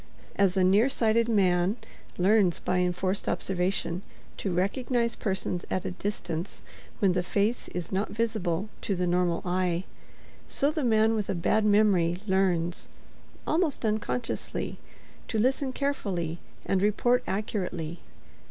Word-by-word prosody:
As 195 -1 +2
a 185 - +4
nearsighted 225 +3 +3
man 190 -1 +3 0.4
learns 190 -1 +3
by 180 - 0
enforced 180 +2 0
observation 180 -1 -1 0.4
to 195 - -2
recognize 235 +6 0
persons 190 -3 -2
at 185 - -2
a 190 - -2
distance 185 -2 -4 0.3
when 195 -2 +3
the 180 0 +1
face 205 +6 0
is 175 -2 -5
not 195 +2 0
visible 210 -4 -1
to 200 - -1
the 180 0 0
normal 175 -1 +1
eye, 180 -1 0 0.6
so 285 +2 +2
the 310 -1 -2
man 220 -2 +4
with 210 -3 -2
a 195 - 0
bad 210 +5 +2
memory 200 -5 +4
learns, 180 -3 +1 0.6
almost 315 -7 0
unconsciously, 220 +2 -2 0.5
to 225 - -2
listen 260 +4 +1
carefully 190 - -2 0.3
and 190 -1 +1
report 240 +4 +3
accurately. 180 -5 -3
195 Hz, 130 wpm, -28 LUFS, 180-220 Hz, 0.6 s, a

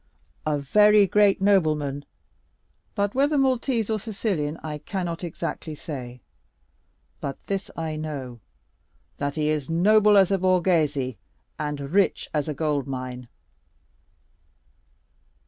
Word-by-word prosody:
"A 150 -1 +1
very 210 +8 +5
great 200 0 +3
nobleman, 155 -8 +2 0.9
but 205 -1 0
whether 285 +3 +2
Maltese 255 -4 +1
or 220 -1 -1
Sicilian 195 -8 -2
I 150 -1 -5
cannot 175 +1 -4
exactly 160 -2 -5
say; 125 -5 -7 1.0
but 140 - -4
this 195 0 -3
I 160 -2 -3
know, 140 -6 -6 0.8
that 145 0 -2
he 155 -1 0
is 150 -2 -1
noble 210 +5 +5
as 195 -1 +5
a 195 - +2
Borghese 160 - +1 0.4
and 150 -1 -3
rich 170 +8 +1
as 150 -2 0
a 150 - -3
gold 145 -3 -1
mine." 125 -2 -5
160 Hz, 115 wpm, -25 LUFS, 145-200 Hz, 1.0 s, very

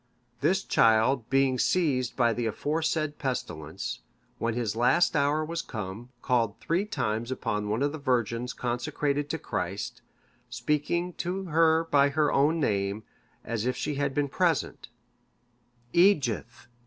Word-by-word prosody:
This 185 +7 +2
child 115 +2 +3
being 135 -1 +2
seized 135 -9 +1
by 120 -2 +3
the 120 0 -2
aforesaid 155 +4 -1
pestilence, 80 - -4 0.4
when 115 -1 -1
his 115 -4 -1
last 125 +10 +3
hour 145 +2 +2
was 165 +1 -3
come, 110 +2 -7
called 115 -4 +1
three 175 +5 0
times 110 - -2
upon 105 -5 -2
one 110 +6 0
of 145 - +1
the 155 - -6
virgins 125 -3 0
consecrated 140 +4 -2
to 160 - -1
Christ, 105 - -4 0.5
speaking 150 +8 -1
to 185 +2 -3
her 165 -1 +3
by 145 -3 +3
her 150 +1 +1
own 150 +4 +3
name, 100 -5 0 0.4
as 115 0 -2
if 125 - 0
she 150 - -2
had 140 -1 -1
been 145 -1 +1
present, 165 -4 0 1.0
Eadgyth! 150 - +2
130 Hz, 140 wpm, -28 LUFS, 115-155 Hz, 1.0 s, child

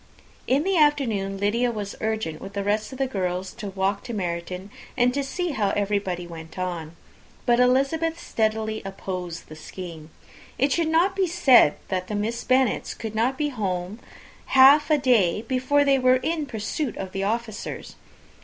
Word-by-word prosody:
In 275 +3 +2
the 385 0 +1
afternoon 230 -11 +2
Lydia 220 +5 +1
was 205 -3 -5
urgent 220 -8 -2
with 195 - -8
the 200 - -2
rest 210 +3 -1
of 260 - -8
the 270 - +1
girls 185 -5 -3
to 210 - -7
walk 195 +1 -1
to 240 - -5
Meryton, 180 +1 -4 0.3
and 250 0 +3
see 350 +5 -2
how 210 -8 0
everybody 200 -3 -1
went 165 -1 -10
on; 170 -3 -4 0.5
but 240 0 +3
Elizabeth 275 +7 +2
steadily 220 -4 -1
opposed 185 -3 -6
the 155 - -10
scheme. 160 -1 -9 0.5
It 275 +3 +2
should 335 +3 +1
not 340 +4 +2
be 385 -1 +1
said, 275 - +5
that 185 -1 -2
the 210 - -3
Miss 220 +3 -2
Bennets 260 0 +1
could 220 -2 -6
not 240 +5 0
be 300 -1 0
at - - -10
home 185 0 -3 0.6
half 285 +4 +8
a 305 - +5
day 225 -8 +2
before 265 +3 +1
they 275 -1 +4
were 255 0 +4
in 320 -3 -1
pursuit 230 +3 -3
of 190 -1 -5
the 195 +1 -3
officers. 220 +1 -4
220 Hz, 175 wpm, -24 LUFS, 190-265 Hz, 0.6 s, half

